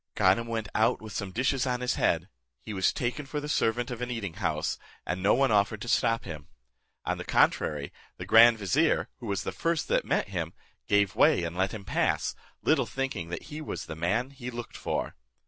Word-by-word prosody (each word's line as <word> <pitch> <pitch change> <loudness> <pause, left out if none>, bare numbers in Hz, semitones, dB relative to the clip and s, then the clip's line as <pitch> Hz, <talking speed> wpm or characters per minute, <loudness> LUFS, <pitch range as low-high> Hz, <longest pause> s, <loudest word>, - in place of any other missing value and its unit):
Ganem 95 +5 +3
went 115 -2 -2
out 110 - +3
with 110 -2 -9
some 100 0 -3
dishes 130 +5 +1
on 125 -1 0
his 125 - +1
head: - - +1 0.3
he 105 - -7
was 95 -1 +2
taken 125 +3 -3
for 150 +2 -3
the 145 - -5
servant 120 -2 +1
of 120 -1 -5
an 125 - -2
eating 110 -8 -3
house, - - -1 0.3
and 90 +1 -2
no 100 +3 +4
one 135 0 +3
offered 105 0 +2
to - - -7
stop 115 -1 +2
him. 75 -2 -8 0.6
On - - -1
the - - -4
contrary, 75 -2 +1 0.2
the 90 - -6
grand 115 +3 +7
vizier, 140 - +2
who 120 - -7
was 100 -3 -1
the - - -3
first 165 -1 -1
that - - +2
met - - 0
him, - - -3 0.3
gave 100 -1 +3
way 90 - +4
and 85 0 -3
let 95 +1 +1
him 105 -3 -7
pass, - - 0 0.3
little - - +3
thinking 135 -11 -3
that 85 - -5
he 155 - -5
was 155 - -5
the 80 - -6
man 105 - 0
he 125 -2 -7
looked 120 -1 -7
for. - - -2
115 Hz, 215 wpm, -28 LUFS, 95-125 Hz, 0.6 s, grand